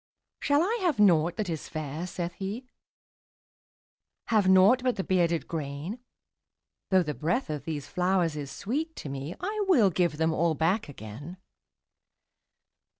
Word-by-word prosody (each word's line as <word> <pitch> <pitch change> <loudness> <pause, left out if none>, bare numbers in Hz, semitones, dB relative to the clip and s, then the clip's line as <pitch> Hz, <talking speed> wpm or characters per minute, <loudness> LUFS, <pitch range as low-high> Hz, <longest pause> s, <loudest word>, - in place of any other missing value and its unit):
``Shall 285 +1 +3
I 450 +6 0
have 330 - +1
nought 175 -4 +4
that 215 -3 -2
is 160 -3 -4
fair?'' 155 +3 -4
saith 175 -1 -4
he; 200 +8 -5 1.7
``Have 210 -4 +4
nought 190 +7 +6
but 250 -1 +1
the 195 - -2
bearded 170 -3 +1
grain? 155 - -5 0.9
Though 185 -1 +4
the 150 -2 -3
breath 170 - -1
of 150 -2 -5
these 150 -4 -4
flowers 180 0 +1
is 145 -2 -5
sweet 300 - -3
to 145 - -7
me, 140 +5 -5
I 415 +2 -2
will 235 - +5
give 170 -2 +1
them 160 0 +1
all 165 0 +1
back 165 +5 0
again.'' 140 - -9
175 Hz, 150 wpm, -28 LUFS, 155-215 Hz, 1.7 s, nought